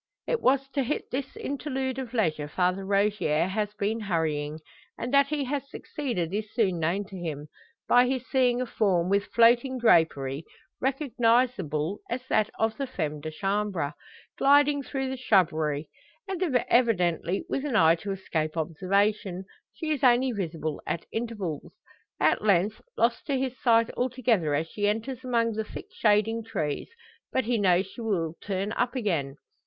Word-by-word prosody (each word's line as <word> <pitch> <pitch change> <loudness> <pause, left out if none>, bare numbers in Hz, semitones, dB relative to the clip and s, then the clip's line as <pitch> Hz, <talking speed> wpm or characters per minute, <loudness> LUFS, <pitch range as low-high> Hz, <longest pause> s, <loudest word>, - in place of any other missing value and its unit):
It 480 -2 -1
was 270 +1 +3
to 275 0 -1
hit 265 +4 -3
this 265 +1 -4
interlude 265 -2 -3
of 255 -2 -6
leisure 155 -9 0
Father 180 +4 0
Rogier 200 -5 +1
has 210 +2 -2
been 215 +2 -1
hurrying; 160 -6 -1 0.4
and 245 +3 -4
that 280 0 +5
he 295 -1 -1
has 275 +1 -3
succeeded 235 - -4
is 210 0 -3
soon 190 -7 +1
known 175 +6 0
to 195 - -11
him, 155 -5 -5 0.4
by 245 +1 +5
his 255 -1 -2
seeing 250 -2 +2
a - - 0
form 185 -7 +1
with 200 +1 +2
floating 240 +3 +4
drapery, 160 - +3 0.4
recognisable 235 - +1
as 250 +2 -3
that 215 -1 +2
of 220 0 0
the 275 - -2
femme 155 - -3
de 155 - -4
chambre. 195 -3 -1 0.5
Gliding 285 +1 +5
through 270 0 -3
the 265 - -4
shrubbery, 160 - +1 0.4
and 380 -2 -4 0.3
evidently 190 -6 +2
with 275 - -2
an 285 -5 -2
eye 165 -6 +6
to 200 +4 -5
escape 160 -4 -2
observation, 190 +3 0 0.3
she 315 -1 -4
is 295 -3 -1
only 255 +1 +5
visible 165 -7 -3
at 170 - -2
intervals; 210 -10 -4 0.5
at - - +3
length 205 +1 +2 0.2
lost 230 0 +1
to 280 -2 +1
his 260 -1 -2
sight 230 -3 +4
altogether 235 - +1
as 155 +3 -1
she 205 +4 -1
enters 230 +5 -2
among 235 -2 +1
the 220 0 -2
thick - - -9
standing 220 +1 +2
trees. 150 -9 -3 0.4
But 260 - 0
he 235 -1 +1
knows 185 -2 +3
she 195 +6 -10
will 175 -8 -1
turn 195 +1 -2
up 245 +3 -1
again. 165 - -1
210 Hz, 160 wpm, -27 LUFS, 175-250 Hz, 0.5 s, eye